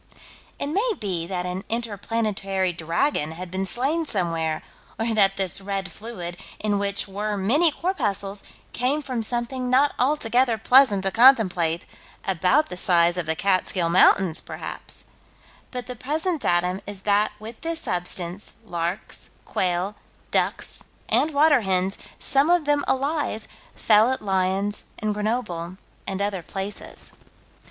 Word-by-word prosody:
It -, -, -2 dB
may 405 Hz, +11 st, +1 dB
be 180 Hz, -5 st, -2 dB
that 180 Hz, -1 st, -3 dB
an 180 Hz, +2 st, -4 dB
inter 230 Hz, -2 st, -2 dB
planetary 195 Hz, -4 st, -1 dB
dragon 165 Hz, -, 0 dB
had 175 Hz, +1 st, -8 dB
been 190 Hz, +1 st, -1 dB
slain 280 Hz, -, +1 dB
somewhere, 165 Hz, -, -1 dB, 0.3 s
or 225 Hz, +1 st, 0 dB
that 195 Hz, -2 st, +4 dB
this 195 Hz, 0 st, -1 dB
red 195 Hz, -1 st, -3 dB
fluid, 175 Hz, -5 st, -7 dB, 0.2 s
in 205 Hz, -1 st, 0 dB
which 200 Hz, 0 st, -1 dB
were 205 Hz, +2 st, -3 dB
many 270 Hz, -, +3 dB
corpuscles, 205 Hz, -, -2 dB, 0.3 s
came 275 Hz, +5 st, 0 dB
from 255 Hz, -4 st, -2 dB
something 240 Hz, +3 st, -2 dB
not 275 Hz, +3 st, +4 dB
altogether 250 Hz, -3 st, +2 dB
pleasant 220 Hz, -3 st, +5 dB
to 195 Hz, -, +1 dB
contemplate, 185 Hz, -9 st, +4 dB, 0.4 s
about 190 Hz, -, +2 dB
the 180 Hz, -, -6 dB
size 175 Hz, -2 st, +3 dB
of 175 Hz, -3 st, -3 dB
the 160 Hz, -, 0 dB
Catskill 185 Hz, -1 st, +1 dB
Mountains, 180 Hz, -1 st, +5 dB
perhaps -, -, -8 dB, 0.7 s
but 250 Hz, -2 st, -5 dB
the 250 Hz, 0 st, -6 dB
present 310 Hz, +6 st, -1 dB
datum 180 Hz, +2 st, +1 dB
is 200 Hz, -2 st, -7 dB
that 210 Hz, +1 st, +2 dB
with 220 Hz, +2 st, -9 dB
this 330 Hz, 0 st, -1 dB
substance, 180 Hz, +1 st, -2 dB
larks, 175 Hz, +1 st, -4 dB, 0.2 s
quail, 185 Hz, +2 st, -1 dB, 0.4 s
ducks, -, -, 0 dB, 0.3 s
and 315 Hz, -, +3 dB
water 290 Hz, -2 st, +5 dB
hens, 190 Hz, -1 st, 0 dB, 0.2 s
some 275 Hz, +3 st, +3 dB
of 350 Hz, -3 st, +3 dB
them 290 Hz, 0 st, +2 dB
alive, 275 Hz, -4 st, -1 dB, 0.3 s
fell 220 Hz, +3 st, +4 dB
at 260 Hz, -, -3 dB
Lyons 195 Hz, +1 st, 0 dB
and 215 Hz, -1 st, -1 dB
Grenoble 205 Hz, -5 st, -2 dB, 0.3 s
and 195 Hz, +1 st, -1 dB
other 200 Hz, -3 st, -2 dB
places. 195 Hz, +4 st, -5 dB
205 Hz, 140 wpm, -24 LUFS, 185-250 Hz, 0.7 s, pleasant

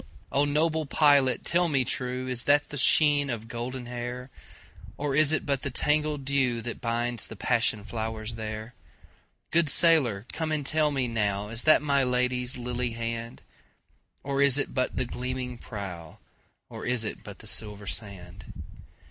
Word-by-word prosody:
O 140 Hz, +1 st, +2 dB
noble 155 Hz, +1 st, +1 dB
pilot 140 Hz, -2 st, +4 dB
tell 175 Hz, 0 st, +3 dB
me 135 Hz, -4 st, +2 dB
trueIs 125 Hz, -1 st, -2 dB
that 145 Hz, +1 st, +3 dB
the 145 Hz, -, -6 dB
sheen 145 Hz, +1 st, +4 dB
of 115 Hz, -2 st, -4 dB
golden 120 Hz, +2 st, -5 dB
hair? 125 Hz, +1 st, -6 dB, 0.7 s
Or 145 Hz, -1 st, -2 dB
is 155 Hz, +1 st, +4 dB
it 155 Hz, -, 0 dB
but 140 Hz, -2 st, 0 dB
the 140 Hz, -, -2 dB
tangled 150 Hz, +1 st, 0 dB
dewThat 125 Hz, -4 st, 0 dB
binds 120 Hz, -1 st, 0 dB
the 110 Hz, -, -9 dB
passion 115 Hz, -1 st, +1 dB
flowers 110 Hz, 0 st, -4 dB
there? 110 Hz, +1 st, -6 dB, 0.8 s
Good 165 Hz, -2 st, +3 dB
sailor 130 Hz, -, +4 dB
come 160 Hz, -1 st, -3 dB
and 150 Hz, -2 st, -1 dB
tell 155 Hz, +1 st, +2 dB
me 135 Hz, -3 st, 0 dB
nowIs 105 Hz, 0 st, -2 dB
that 155 Hz, -1 st, +6 dB
my 140 Hz, -2 st, +2 dB
Lady's 125 Hz, 0 st, 0 dB
lily 120 Hz, -1 st, -3 dB
hand? 115 Hz, 0 st, -5 dB, 0.8 s
Or 140 Hz, 0 st, -1 dB
is 140 Hz, -1 st, +5 dB
it 145 Hz, -, -2 dB
but 130 Hz, -1 st, -1 dB
the 130 Hz, -, 0 dB
gleaming 125 Hz, 0 st, -5 dB
prow, 90 Hz, -7 st, -8 dB, 0.5 s
Or -, -, -9 dB
is 120 Hz, -2 st, 0 dB
it 105 Hz, -, -5 dB
but -, -, -10 dB
the -, -, -14 dB
silver 105 Hz, -1 st, -4 dB
sand? 95 Hz, -3 st, -7 dB
125 Hz, 155 wpm, -27 LUFS, 115-140 Hz, 0.8 s, that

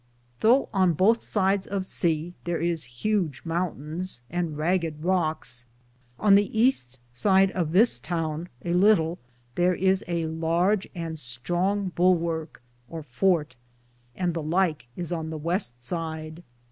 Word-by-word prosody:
Thoughe 245 Hz, +5 st, +4 dB
on 185 Hz, -3 st, +3 dB
bothe 220 Hz, +8 st, +4 dB
sides 195 Hz, -1 st, 0 dB
of 195 Hz, -1 st, -2 dB
seae 170 Hz, -2 st, -1 dB
tharis 165 Hz, -8 st, -3 dB
hudge 185 Hz, -11 st, 0 dB
mountains 165 Hz, -2 st, -3 dB
and 170 Hz, -3 st, -2 dB
Raged 160 Hz, -1 st, -1 dB
Rockes, 155 Hz, -9 st, 0 dB, 0.5 s
on 210 Hz, -2 st, +4 dB
the 200 Hz, 0 st, +5 dB
Easte 220 Hz, -, +1 dB, 0.3 s
end 195 Hz, -1 st, +5 dB
of 170 Hz, -5 st, -2 dB
this 215 Hz, +7 st, +4 dB
towne 165 Hz, 0 st, -3 dB, 0.2 s
a 170 Hz, -, 0 dB
litle 180 Hz, -3 st, +3 dB, 0.4 s
tharis 185 Hz, +2 st, +2 dB
a 170 Hz, -2 st, -1 dB
Large 165 Hz, +5 st, 0 dB
and 165 Hz, -2 st, -4 dB
stronge 175 Hz, +10 st, -1 dB
bullworke 170 Hz, -3 st, +1 dB, 0.3 s
(or 165 Hz, -1 st, -6 dB
forte), 150 Hz, +2 st, +1 dB, 0.6 s
and 180 Hz, -2 st, -1 dB
the 165 Hz, -, -3 dB
Lyke 160 Hz, -3 st, 0 dB
is 175 Hz, -1 st, -5 dB
on 160 Hz, -2 st, -3 dB
the 160 Hz, -, -4 dB
weste 150 Hz, -, -1 dB
side. 160 Hz, +2 st, -4 dB
170 Hz, 135 wpm, -26 LUFS, 160-190 Hz, 0.6 s, the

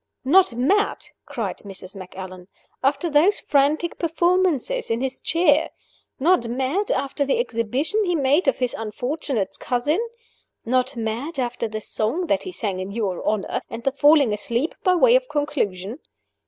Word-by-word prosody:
"Not 340 Hz, -2 st, +5 dB
mad!" 390 Hz, -, +1 dB, 0.2 s
cried -, -, -4 dB
Mrs. 195 Hz, -1 st, -8 dB
Macallan, 185 Hz, -1 st, -9 dB, 0.4 s
"after 280 Hz, +5 st, +1 dB
those 335 Hz, +7 st, +4 dB
frantic 295 Hz, +4 st, +1 dB
performances 355 Hz, -, +1 dB
in 225 Hz, 0 st, 0 dB
his 265 Hz, +1 st, -3 dB
chair? 325 Hz, -2 st, +3 dB, 0.5 s
Not 310 Hz, -4 st, +3 dB
mad, 265 Hz, -, -1 dB
after 280 Hz, +1 st, 0 dB
the 280 Hz, -, +1 dB
exhibition 270 Hz, -, 0 dB
he 355 Hz, -1 st, +1 dB
made 290 Hz, +3 st, +2 dB
of 270 Hz, -, +3 dB
his 250 Hz, -2 st, -1 dB
unfortunate 230 Hz, 0 st, -3 dB
cousin? 265 Hz, -, 0 dB, 0.7 s
Not 255 Hz, +3 st, +1 dB
mad, 230 Hz, +8 st, -3 dB
after 245 Hz, -2 st, -2 dB
the 215 Hz, 0 st, -5 dB
song 230 Hz, -, -1 dB
that 300 Hz, -3 st, +1 dB
he 370 Hz, -, -6 dB
sang 200 Hz, -, -3 dB
in 185 Hz, +1 st, -4 dB
your 200 Hz, -4 st, -2 dB
honor, 210 Hz, -2 st, -1 dB
and 230 Hz, +1 st, -7 dB
the 270 Hz, -, +2 dB
falling 290 Hz, -4 st, +4 dB
asleep 235 Hz, +8 st, -1 dB
by 370 Hz, -2 st, +4 dB
way 475 Hz, +7 st, +5 dB
of -, -, +1 dB
conclusion? 250 Hz, -7 st, -2 dB
270 Hz, 155 wpm, -23 LUFS, 225-330 Hz, 0.7 s, Not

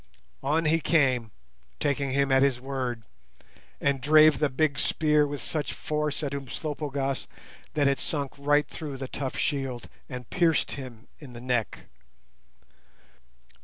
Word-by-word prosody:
On 155 Hz, +4 st, +1 dB
he 160 Hz, +2 st, +3 dB
came, 130 Hz, -8 st, +2 dB, 0.5 s
taking 140 Hz, -1 st, 0 dB
him 140 Hz, +1 st, +1 dB
at 135 Hz, 0 st, +5 dB
his 135 Hz, -3 st, +3 dB
word, 130 Hz, -3 st, -3 dB, 0.8 s
and 140 Hz, -2 st, +1 dB
drave 155 Hz, 0 st, +6 dB
the 150 Hz, -1 st, +2 dB
big 140 Hz, 0 st, +1 dB
spear 150 Hz, -1 st, +3 dB
with 145 Hz, -1 st, -5 dB
such 150 Hz, -3 st, -2 dB
force 150 Hz, 0 st, -2 dB
at 140 Hz, -1 st, -2 dB
Umslopogaas 140 Hz, 0 st, -3 dB, 0.5 s
that 145 Hz, -2 st, +3 dB
it 140 Hz, 0 st, +2 dB
sunk 140 Hz, -3 st, -1 dB
right 145 Hz, +1 st, +3 dB
through 145 Hz, -4 st, -6 dB
the 135 Hz, 0 st, -5 dB
tough 135 Hz, 0 st, -4 dB
shield 135 Hz, -5 st, -2 dB, 0.2 s
and 125 Hz, -4 st, -7 dB
pierced 165 Hz, -3 st, +2 dB
him 125 Hz, -4 st, -8 dB
in 140 Hz, -5 st, -11 dB
the 120 Hz, -, -8 dB
neck. 125 Hz, -4 st, -1 dB
140 Hz, 140 wpm, -27 LUFS, 130-150 Hz, 0.8 s, drave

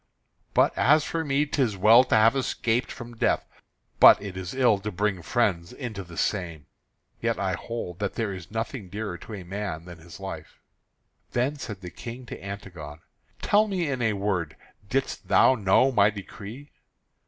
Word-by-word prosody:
But -, -, +4 dB
as 150 Hz, +2 st, +4 dB
for 165 Hz, +1 st, -2 dB
me, 145 Hz, 0 st, +1 dB
'tis 130 Hz, -8 st, 0 dB
well 110 Hz, +6 st, +7 dB
to -, -, +2 dB
have 110 Hz, +3 st, +5 dB
escaped 120 Hz, -2 st, 0 dB
from 120 Hz, -1 st, -9 dB
death, -, -, +1 dB, 0.5 s
but -, -, +9 dB
it 100 Hz, -2 st, -7 dB
is 95 Hz, +4 st, -6 dB
ill 120 Hz, -6 st, +4 dB
to 105 Hz, +2 st, -4 dB
bring 100 Hz, -1 st, -1 dB
friends 95 Hz, -5 st, 0 dB
into 110 Hz, -7 st, -6 dB
the 85 Hz, -2 st, -12 dB
same. 85 Hz, -7 st, -2 dB, 0.6 s
Yet 115 Hz, 0 st, 0 dB
I 95 Hz, -2 st, 0 dB
hold 90 Hz, -2 st, -5 dB
that 100 Hz, -2 st, -2 dB
there 110 Hz, -4 st, -2 dB
is 90 Hz, -3 st, -9 dB
nothing 110 Hz, -2 st, -4 dB
dearer 105 Hz, -3 st, -5 dB
to 110 Hz, -, -8 dB
a 95 Hz, -, -8 dB
man 90 Hz, -3 st, -5 dB
than 85 Hz, -2 st, -11 dB
his 85 Hz, +2 st, -12 dB
life." 95 Hz, 0 st, -8 dB, 0.7 s
Then 130 Hz, +5 st, 0 dB
said 105 Hz, -8 st, -7 dB
the 90 Hz, -1 st, -8 dB
King 120 Hz, +2 st, -8 dB
to -, -, -9 dB
Antigone: 90 Hz, -7 st, -8 dB, 0.4 s
"Tell 210 Hz, +1 st, +4 dB
me 180 Hz, -7 st, -1 dB
in 130 Hz, -2 st, -2 dB
a 110 Hz, -2 st, +2 dB
word, 95 Hz, -6 st, -2 dB, 0.3 s
didst 135 Hz, +1 st, -2 dB
thou -, -, +6 dB
know 110 Hz, +3 st, +3 dB
my 105 Hz, -4 st, +5 dB
decree?" 110 Hz, +6 st, -9 dB
105 Hz, 175 wpm, -26 LUFS, 95-120 Hz, 0.7 s, but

